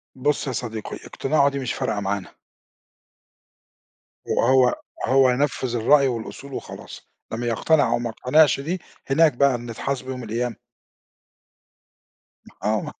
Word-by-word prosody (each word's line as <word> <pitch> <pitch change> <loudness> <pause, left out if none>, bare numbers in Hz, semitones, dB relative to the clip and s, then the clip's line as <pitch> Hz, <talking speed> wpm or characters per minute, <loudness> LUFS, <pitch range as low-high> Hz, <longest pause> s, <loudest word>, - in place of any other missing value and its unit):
بًصّ 145 +2 0
يا - - -1
صديقي، 110 -2 -5
اقتناعه 140 0 +1
دي 140 - -4
مش 130 -3 -2
فارقة 105 - -2
معانا. 100 -1 -3 2.0
وهو 130 0 +3 0.3
هو 130 0 +5
ينفّذ 130 -1 0
الرأي 135 +5 +4
والأصول 130 +3 -5
وخلاص، - - -9 0.2
إنّما 120 +2 -3
يقتنع 145 +6 +2
أو - - +1
ما 120 - -3
يقتنعش 135 +4 +3
دي، 170 +6 -3 0.3
هناك 155 +2 +4
بقى 135 0 +3
نتحاسبوا 125 +3 -4
يوم 125 -1 -6
القيامة. 115 +2 -2 2.1
آه 105 +1 -1
130 Hz, 120 wpm, -23 LUFS, 115-140 Hz, 2.1 s, هو